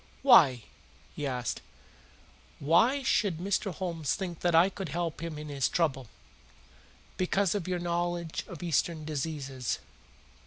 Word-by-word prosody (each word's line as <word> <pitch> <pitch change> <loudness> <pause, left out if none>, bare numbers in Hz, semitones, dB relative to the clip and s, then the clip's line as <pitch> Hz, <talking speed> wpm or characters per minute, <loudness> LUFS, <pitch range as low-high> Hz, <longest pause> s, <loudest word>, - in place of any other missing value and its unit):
"Why?" 140 - +7 0.5
he 145 - -3
asked. 125 -4 -3 1.0
"Why 225 - +3
should 200 -7 +1
Mr. 195 +2 -1
Homes 170 -4 -2
think 180 -5 -5
that 175 -2 +1
I 170 +3 +7
could 195 -3 -6
help 165 +1 -3
him 165 -2 -5
in 150 0 -7
his 140 -2 0
trouble?" 135 -7 0 1.1
"Because 185 0 +1
of 200 -5 -3
your 180 -1 0
knowledge 175 -1 -2
of 180 -2 -9
Eastern 165 -1 0
diseases." 140 -4 -3
170 Hz, 130 wpm, -29 LUFS, 150-180 Hz, 1.1 s, Why